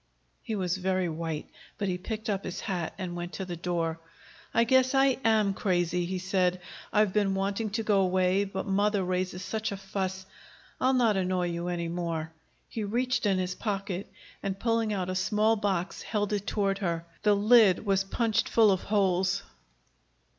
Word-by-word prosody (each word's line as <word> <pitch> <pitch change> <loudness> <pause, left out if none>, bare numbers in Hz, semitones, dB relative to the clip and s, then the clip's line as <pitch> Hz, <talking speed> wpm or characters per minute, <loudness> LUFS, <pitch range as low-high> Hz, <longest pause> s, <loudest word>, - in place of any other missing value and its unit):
He 225 - -4
was 185 -2 -1
very 185 -1 0
white, 160 -1 -4 0.3
but 200 - -1
he 180 -1 -1
picked 220 +4 -5
up 200 -2 -1
his 180 - -5
hat 175 -4 -3
and 180 -2 -4
went 175 0 -5
to 190 - -4
the 175 -1 -5
door. 170 -1 -2 0.5
"I 230 - +4
guess 260 +2 +3
I 270 -1 +4
AM 215 -3 +3
crazy," 175 -2 0
he 185 +1 -2
said. 185 -1 +1 0.3
"I've 210 -2 +3
been 200 -2 +2
wanting 200 +3 -1
to 220 +2 -2
go 205 -2 +3
away, 185 +1 +2
but 195 - -4
mother 205 0 +1
raises 180 0 -2
such 220 +2 -2
a 200 - -4
fuss 190 -1 -4 0.5
I'll 260 +1 +3
not 230 -5 +3
annoy 185 -1 0
you 170 +1 -3
any 170 -1 -2
more." 165 -2 -3 0.4
He 220 - -4
reached 245 +2 0
in 195 -2 +2
his 180 -1 -1
pocket 195 -2 -3 0.3
and, 195 -1 -3
pulling 230 -1 +1
out 185 -3 -1
a - - -2
small 210 +4 +2
box, 195 -4 -2
held 210 -1 -1
it 205 -1 -2
toward 195 -2 0
her. 170 -3 -2 0.2
The 210 -1 +4
lid 210 -2 +5
was 195 -1 +2
punched 220 +2 0
full 220 -3 +5
of 190 - +1
holes. 190 -1 +1
195 Hz, 185 wpm, -28 LUFS, 180-210 Hz, 0.5 s, lid